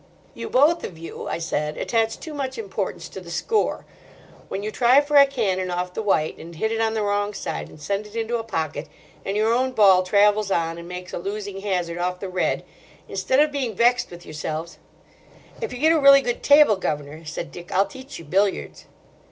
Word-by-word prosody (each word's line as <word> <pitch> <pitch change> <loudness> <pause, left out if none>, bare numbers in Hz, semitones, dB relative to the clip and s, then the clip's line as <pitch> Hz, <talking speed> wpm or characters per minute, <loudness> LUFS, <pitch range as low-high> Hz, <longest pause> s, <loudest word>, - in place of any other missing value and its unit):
"You - - -6
both 300 +6 +4
of 165 - -6
you," 165 +1 -8
I - - -2
said, 150 -2 -2
"attach 225 -1 0
too 315 - -8
much 265 -3 -4
importance 200 -2 -4
to 190 - -8
the 175 - -11
score. 430 - 0 0.6
When 200 - -4
you 215 - -3
try 250 +4 +5
for 290 0 -1
a 280 -1 +9
cannon 195 -9 -1
off 180 0 -3
the - - -3
white 175 -7 0
and 165 +1 -10
hit 220 +7 -1
it 225 0 -1
on 225 0 +1
the 215 - 0
wrong 205 0 0
side - - -4
and - - -14
send 200 +7 -3
it 210 - -15
into 230 +1 -1
a - - -4
pocket, 155 -7 -3 0.4
and 195 +1 -2
your 220 +2 +3
own 255 +2 +1
ball 195 -5 +6
travels 205 +2 +3
on 165 -2 0
and 170 - -9
makes 180 0 -8
a - - -3
losing 200 +1 -5
hazard 180 -4 -2
off 180 +1 -1
the 195 - -5
red, 185 0 -1 0.4
instead 260 - 0
of 300 0 +4
being 260 -7 -2
vexed 240 +3 +3
with 175 0 -11
yourselves—" 155 +2 -5 0.8
"If 455 - -3
you - - -6
get 315 +5 +4
a 320 - +3
really 275 -1 +8
good 240 -3 -2
table, 285 -8 +6
governor," 150 -2 -4
said 160 +2 -6
Dick, 175 0 -10
"I'll 195 +2 +3
teach 265 +3 -10
you 165 - -10
billiards." 195 +6 -1
205 Hz, 215 wpm, -23 LUFS, 175-240 Hz, 0.8 s, a